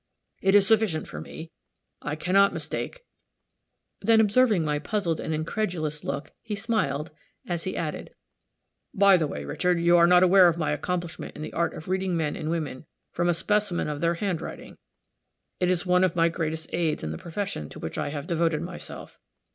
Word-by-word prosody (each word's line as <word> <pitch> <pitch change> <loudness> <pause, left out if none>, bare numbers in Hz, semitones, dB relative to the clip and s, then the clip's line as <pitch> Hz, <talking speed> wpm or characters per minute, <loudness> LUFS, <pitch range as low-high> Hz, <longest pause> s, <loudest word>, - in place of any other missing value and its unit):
It 195 +1 +3
is 200 -1 +6
sufficient 210 -7 +2
for - - -7
me; 165 +1 -9 0.5
I 150 - -3
can 180 +4 -3
not 200 0 +5
mistake," - - -4 1.0
then, 225 -1 +5
observing 215 -4 +4
my 150 -1 0
puzzled 170 -1 -1
and - - -4
incredulous 155 -2 -2
look, 140 +2 -4
he 210 - -4
smiled, 165 - -1 0.4
as 170 -2 -3
he 185 - -3
added, 155 -2 -4 0.9
"By 200 -1 +6
the 160 -4 +1
way, 75 - -6
Richard, 175 - 0
you 170 +1 +5
are 170 0 +6
not 180 +1 +6
aware 185 0 +7
of 170 -1 +1
my 160 -3 0
accomplishment 175 +3 -3
in 150 - -6
the - - -7
art 170 0 0
of 155 - -9
reading 185 -1 0
men 150 -2 -1
and 155 - -4
women 155 -4 -3 0.2
from 175 - 0
a 175 - +3
specimen 210 0 0
of 150 -1 -4
their 170 0 +2
handwriting. 180 -2 -5 0.8
It 180 - +2
is 185 +1 +1
one 180 0 +4
of 185 -1 +2
my 165 0 +4
greatest 160 -1 -4
aids 165 -3 0
in 80 - -3
the 80 - -6
profession 170 - -4
to - - -10
which - - -5
I - - -1
have 145 -1 -5
devoted 165 -2 0
myself. 175 +1 -9
170 Hz, 190 wpm, -26 LUFS, 155-190 Hz, 1.0 s, aware